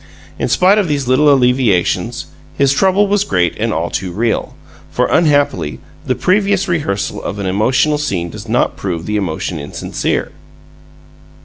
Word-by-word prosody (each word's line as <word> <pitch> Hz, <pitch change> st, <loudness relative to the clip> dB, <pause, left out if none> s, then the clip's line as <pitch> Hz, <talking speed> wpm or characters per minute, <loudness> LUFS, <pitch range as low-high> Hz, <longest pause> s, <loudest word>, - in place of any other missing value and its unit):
In -, -, 0 dB
spite 190 Hz, +4 st, +4 dB
of 200 Hz, -, 0 dB
these 145 Hz, -4 st, -1 dB
little 145 Hz, +4 st, +4 dB
alleviations, 125 Hz, -8 st, +1 dB, 0.3 s
his 140 Hz, -1 st, +3 dB
trouble 190 Hz, +6 st, +3 dB
was 205 Hz, 0 st, +1 dB
great 90 Hz, -, 0 dB
and 115 Hz, +1 st, 0 dB
all 85 Hz, -2 st, -2 dB
too 95 Hz, -2 st, -3 dB
real, 115 Hz, +5 st, -2 dB, 0.3 s
for, -, -, 0 dB
unhappily, 145 Hz, -, +1 dB, 0.3 s
the -, -, +1 dB
previous 195 Hz, 0 st, +1 dB
rehearsal 145 Hz, -, -2 dB
of 100 Hz, -, -5 dB
an 100 Hz, -, -4 dB
emotional 125 Hz, +10 st, +1 dB
scene 90 Hz, -, -2 dB
does 105 Hz, +1 st, -9 dB
not 120 Hz, -, +1 dB
prove 85 Hz, -4 st, -4 dB
the 105 Hz, -, -2 dB
emotion 85 Hz, -3 st, -3 dB
insincere. 70 Hz, -, -3 dB
125 Hz, 150 wpm, -16 LUFS, 95-155 Hz, 0.3 s, spite